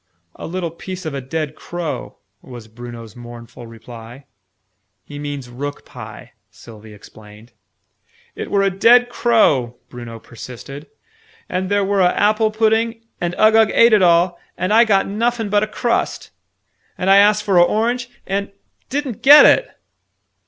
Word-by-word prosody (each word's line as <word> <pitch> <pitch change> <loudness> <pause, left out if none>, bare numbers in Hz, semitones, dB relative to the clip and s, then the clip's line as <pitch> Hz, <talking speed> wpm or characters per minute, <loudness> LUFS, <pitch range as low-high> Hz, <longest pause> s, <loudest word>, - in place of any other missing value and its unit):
"A - - -8
little 170 -1 -4
piece 185 +2 -9
of 155 - -4
a 140 - -4
dead 155 +3 -4
crow," 175 -3 -6 0.2
was 120 -4 -12
Bruno's 115 -1 -11
mournful 120 0 -12
reply. 115 +3 -13 0.8
"He 145 0 -10
means 145 -3 -6
rook 140 +4 -7
pie," - - -12 0.2
Sylvie 110 -2 -15
explained. 105 +2 -16 0.8
"It - - -7
were 200 -1 +1
a 195 - +1
dead 245 +4 +5
crow," 145 - +1
Bruno 120 -2 -9
persisted. 130 +6 -11 0.6
"And 185 0 -3
there 205 -1 +1
were 200 0 0
a 180 -1 +2
apple 215 +1 +2
pudding 225 +1 0 0.2
and 175 0 -2
Uggug 220 0 +4
ate 230 0 +5
it 210 - +5
all 175 0 +3 0.2
and 185 +4 -1
I 230 +2 +6
got 195 -3 +2
nuffin 225 +1 -2
but 205 0 +3
a 215 - -1
crust! 235 +2 -2 0.7
And 180 - -3
I 195 +1 +6
asked 210 +1 +4
for 195 -3 +1
a 175 - +7
orange 235 +6 -1 0.2
and 200 +1 -3 0.4
didn't 270 -5 -4
get 290 +2 +9
it!" - - +4
180 Hz, 150 wpm, -18 LUFS, -, 0.8 s, get